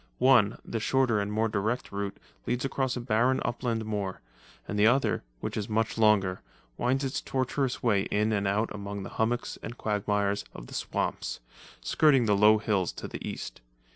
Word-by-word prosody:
One, 120 -6 +5
the 115 - -3
shorter 125 -1 +2
and 100 0 -2
more 110 +2 +1
direct 110 +3 -2
route, 100 -1 -3 0.3
leads 125 +2 0
across 130 -2 -1
a - - -3
barren 120 +2 +2
upland 120 -2 -1
moor, 100 -3 -3 0.5
and 105 - -2
the 105 - +6
other, 135 +4 +2 0.2
which - - -3
is 105 0 -3
much 110 +1 0
longer, 105 -4 +3 0.3
winds 130 +3 0
its 135 -1 -2
tortuous 130 0 -1
way 105 -5 +2
in 105 +1 +1
and 100 -1 0
out 105 +3 0
among 100 -1 -5
the - - -6
hummocks 120 +2 -1
and 120 - -7
quagmires 105 -1 0
of - - -8
the - - -12
swamps, - - -2 0.4
skirting 135 -6 +4
the 105 -2 +3
low 105 +2 +6
hills 100 -4 0
to - - -7
the - - -7
east. - - -6
110 Hz, 180 wpm, -28 LUFS, 100-125 Hz, 0.5 s, the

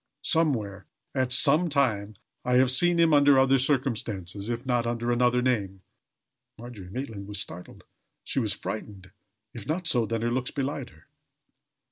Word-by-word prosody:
Somewhere, 125 - +1 0.3
at 130 -1 0
some 145 +6 +4
time, 110 -8 0 0.3
I 125 0 +1
have 130 0 +4
seen 175 +6 +2
him 165 -2 +4
under 145 -1 +6
other 135 0 +4
circumstances, 110 - -2
if 120 +2 -4
not 120 -2 0
under 120 0 -1
another 125 0 +2
name." 100 -7 -1 0.7
Margery 115 -6 -10
Maitland 110 -3 -6
was 105 -1 -5
startled 90 -3 -8 0.4
she - - -2
was 110 -5 0
frightened. 100 -4 -6 0.4
If 115 -4 -9
not 175 +4 -2
so, 120 -8 +2
then 115 0 -2
her 120 - 0
looks 125 0 -1
belied 140 -1 -4
her. 80 0 -22
120 Hz, 155 wpm, -27 LUFS, 105-135 Hz, 0.7 s, under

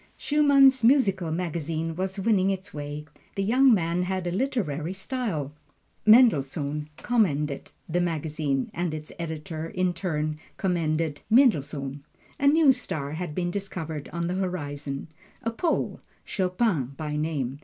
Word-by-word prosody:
Schumann's 275 -4 +5
musical 200 - +4
magazine 165 -1 -2
was 190 +2 -3
winning 195 -2 +3
its 190 -1 -3
way 145 0 -5 0.3
the 195 - 0
young 255 +6 +5
man 175 -4 +2
had 185 0 -2
a 175 - -1
literary 185 - -1
style. 195 - -3 0.6
Mendelssohn 150 - +4
commended 150 - 0 0.2
the 175 +2 0
magazine, 155 -5 -1
and 170 -2 -2
its 155 0 -7
editor 160 0 -4
in 185 0 0
turn 155 -4 -2 0.2
commended 165 -4 0
Mendelssohn. 145 - +2 0.4
A 280 - +3
new 300 -1 +6
star 150 - -3
had 160 -1 -4
been 175 -1 -1
discovered 165 -6 -5
on 170 0 -2
the 175 - -1
horizon 145 -7 -3 0.4
a 230 - 0
Pole, 320 +9 -1 0.3
Chopin 180 - 0
by 150 -1 -3
name. 145 -4 -2
170 Hz, 135 wpm, -26 LUFS, 150-200 Hz, 0.6 s, new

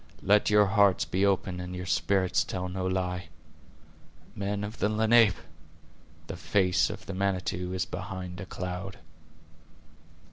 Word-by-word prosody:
Let 105 +2 +4
your 105 0 +5
hearts 100 -2 +3
be 95 +2 -1
open 95 -2 0
and 90 0 -6
your 90 0 -5
spirits 95 0 +1
tell 90 -1 -4
no 95 0 -3
lie. 90 -2 -2 1.1
Men 100 +1 -2
of 105 +2 -6
the 105 - +2
Lenape! 110 -1 +4 0.9
the 80 - -6
face 90 -2 +2
of - - -8
the 95 - -6
Manitou 90 -1 -2
is 95 0 -1
behind 90 -1 -6
a 95 - -8
cloud." 90 +1 -5
95 Hz, 140 wpm, -28 LUFS, 90-100 Hz, 1.1 s, your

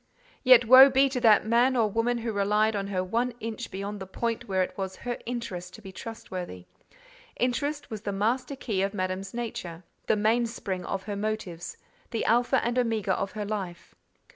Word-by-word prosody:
Yet, 250 -2 +7
woe 260 +4 +10
be 270 +1 +4
to 255 -2 -3
that 220 -3 +5
man 240 +4 +3
or 225 -2 +3
woman 230 +3 0
who 230 -1 -3
relied 210 +2 +2
on 195 -1 -2
her 185 -2 -1
one 235 +6 -1
inch 225 -1 -5
beyond 200 +2 -5
the 190 - -7
point 230 +4 -3
where 190 -2 +1
it - - -6
was 190 -1 -4
her 245 +3 -5
interest 185 -7 -5
to 220 - -13
be 190 - -9
trustworthy: 185 - -7 0.7
interest 285 +4 -1
was 215 -2 -5
the 205 - -3
master 245 +7 -1
key 215 -7 -2
of 195 +2 -1
Madame's 185 0 -3
nature—the 200 -5 -4
mainspring 215 -3 0
of 195 -1 -3
her 205 0 -4
motives—the 210 +1 -5
alpha 240 +3 +2
and 240 +1 +1
omega 220 -5 0
of 195 - -3
her 210 -1 -4
life. 185 -5 -5
215 Hz, 180 wpm, -27 LUFS, 190-240 Hz, 0.7 s, woe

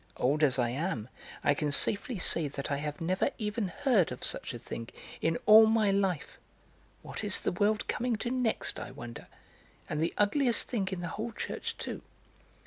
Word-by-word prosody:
Old 145 +4 +1
as 135 -4 +4
I 120 -2 +2
am, 130 - -2 0.3
I 145 - +4
can 150 +1 -1
safely 205 - +1
say 170 -3 +2
that 140 0 -5
I 140 - +1
have 150 +1 -4
never 185 +3 +1
even 210 -1 -2
heard 200 - +2
of 125 - -7
such - - -2
a 120 - -6
thing 115 0 -7 0.3
in 165 0 +1
all 220 +1 +9
my 220 -2 +3
life! 190 -6 -1 0.6
What - - -6
is - - +1
the - - -1
world 205 +4 +1
coming 245 0 0
to 240 +3 -3
next, 250 -3 -1
I - - -6
wonder! 120 -1 -9 0.6
And 150 - -2
the 165 - 0
ugliest 240 +4 +3
thing 210 -6 -1
in 185 -2 -3
the 175 - -3
whole 225 +2 -4
church, - - -4
too." - - -5
185 Hz, 190 wpm, -30 LUFS, 145-220 Hz, 0.6 s, all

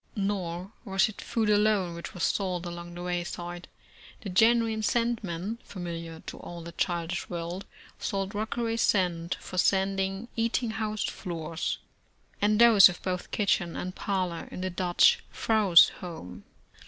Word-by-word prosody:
Nor 195 -3 -2
was 195 -3 +2
it 215 - -9
food 225 -2 -1
alone 205 -4 +3
which 170 +2 -8
was 175 - -3
sold 185 -3 0
along 175 0 -7
the 175 - -6
way 175 -1 -1
side. 175 +1 -6 0.5
The 200 - -6
genuine 225 +3 +3
"sand 235 +1 +1
man," 190 +5 -4
familiar 170 -3 -6
to - - -8
all 175 -1 -8
the 170 - -8
childish 170 0 -2
world, 175 +2 -4 0.3
sold 195 0 -2
Rockaway 225 +2 -2
sand 175 -6 +1
for 185 - -4
sanding 195 +2 +1
eating 230 0 0
house 215 -1 -2
floors, 165 -3 -3 0.6
and 210 +1 +3
those 225 -6 +9
of 175 - -7
both 180 -1 -3
kitchen 185 -4 0
and 185 0 -4
parlor 185 -4 -2
in - - -6
the 185 0 -2
Dutch 175 0 +4
vrouw's 210 -6 +6
home. 160 - -9
185 Hz, 150 wpm, -28 LUFS, 175-210 Hz, 0.6 s, those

